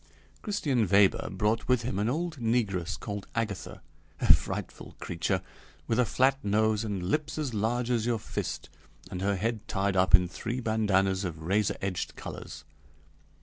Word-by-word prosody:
Christian 150 - 0
Weber 100 0 +4
brought 105 +3 0
with 125 -2 +3
him 110 -5 -2
an 105 +3 +1
old 160 +3 -2
negress 105 -7 0
called 100 -1 -5
Agatha: 110 -5 -3 0.4
a - - +7
frightful - - -4
creature, 85 -2 -1 0.4
with 115 - 0
a 125 - +5
flat 135 +3 +2
nose 110 +1 +2
and 100 -4 -3
lips 150 0 -1
as 145 -6 -2
large 115 +3 0
as 115 -2 +1
your 120 -1 +2
fist, 110 - -4 0.4
and 90 - -4
her 100 +1 +1
head 110 +3 -2
tied 95 0 0
up 95 0 +7
in 90 -1 +1
three 115 +7 -4
bandanas 100 -4 +1
of 80 -4 -5
razor 100 +4 +1
edged 95 -2 -2
colors. 75 - -8
105 Hz, 160 wpm, -29 LUFS, 95-120 Hz, 0.4 s, a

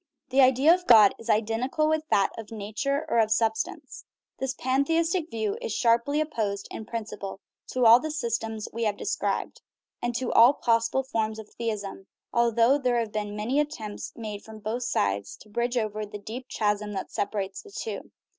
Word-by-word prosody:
The 265 +1 +4
idea 265 +5 +6
of 360 0 -2
God 215 -4 +8
is 230 - -10
identical 225 +8 +1
with 315 0 0
that 195 - +3
of 225 -2 -8
nature 225 +8 -2
or 230 - +3
sub 220 0 +2
stance. - - -6 0.4
This 265 0 -2
pantheistic 325 +6 +1
view 220 -3 -2
is 220 - -3
sharply 235 +5 +2
opposed 215 -10 -2
in 220 - -6
principle 215 -4 -5 0.3
to 255 -1 0
all 230 +2 +9
the 310 - -4
systems 225 -7 -3
we 230 0 -1
have 205 -1 0
described, 430 +3 -2 0.4
and 240 0 -2
to 250 0 -1
all 235 +4 +8
possible 230 +3 +1
forms 220 -4 -2
of 220 -1 -9
theism 205 -4 -4 0.3
although 235 +3 +4
there 250 -3 +1
have 230 -2 -1
been 210 -1 -3
many 230 +7 0
attempts 220 -9 -4
made 210 -3 -6
from 220 0 -11
both 215 +3 -3
sides 100 0 -1
to 215 - -17
bridge 240 +3 -1
over 215 -2 -1
the 210 0 -7
deep 230 +5 -8
chasm 210 -1 -1
that 190 - -5
separates 200 -1 -3
the - - -15
two. 445 +3 -6
230 Hz, 180 wpm, -27 LUFS, 210-260 Hz, 0.4 s, all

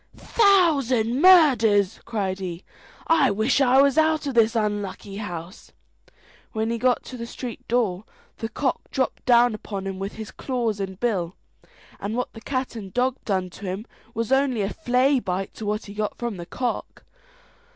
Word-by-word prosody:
"Thousand 280 - +3
murders!" 230 - +5
cried 195 -4 -2
he; 180 -1 -5 0.4
"I 315 -5 +4
wish 220 +7 +1
I 265 +1 +6
was 280 +2 +3
out 315 -1 +2
of 275 - -2
this 230 0 +3
unlucky 205 -2 -2
house." 180 -2 -7 0.8
When 220 0 -1
he 235 - -2
got 250 +1 +2
to 255 - -9
the 235 0 -6
street 240 -1 -7
door, 215 -5 0 0.3
the 225 - -3
cock 260 +2 -1
dropped 260 - -2
down 240 -1 +5
upon 200 -2 -6
him 195 -1 -4
with 195 +1 -4
his 220 -1 -8
claws 235 -6 -2
and 190 -1 -5
bill, 190 -7 -1 0.6
and 205 +3 -3
what 250 - -3
the 225 - -11
cat 255 -1 -3
and 200 -4 -7
dog 255 +4 0
done 185 -3 -1
to 200 - -10
him 190 +4 -4 0.3
was 230 +1 -2
only 265 -5 +2
a 195 - -1
flay 260 -1 +2
bite 190 -3 -3
to 215 - -7
what 210 +1 -2
he 200 - -9
got 210 0 -3
from 235 -5 -4
the 170 -1 -8
cock. 250 +4 -4
225 Hz, 175 wpm, -24 LUFS, 200-255 Hz, 0.8 s, I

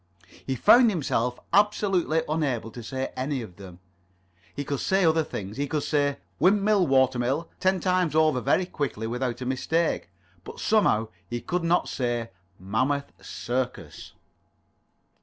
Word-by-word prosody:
He 135 - 0
found 240 - +6
himself 125 - -1
absolutely 195 -5 +2
unable 140 -8 -1
to 120 - -8
say 130 +3 -4
any 135 +2 -2
[Pg - - -5
30]of - - -24
them. 90 -3 -11 0.8
He 145 - -3
could 140 -1 -3
say 190 -1 +2
other 160 0 +3
things. 100 -6 -7
He 140 +1 -1
could 150 0 -2
say 145 -2 +1 0.2
"Windmill, 200 +2 +3
watermill" 130 +3 +1
ten 190 0 +2
times 180 -3 +1
over, 155 -5 +3
very 180 - +2
quickly, 140 -10 -3
without 125 +1 -3
a - - -3
mistake. 145 - -1 0.3
But - - -10
somehow 115 - +2 0.2
he 120 - -3
could 180 +7 -2
not 170 +1 +2
say 120 -2 -2 0.3
Mammoth 130 +9 -1
Circus. 125 +1 -4
140 Hz, 145 wpm, -26 LUFS, 125-170 Hz, 0.8 s, found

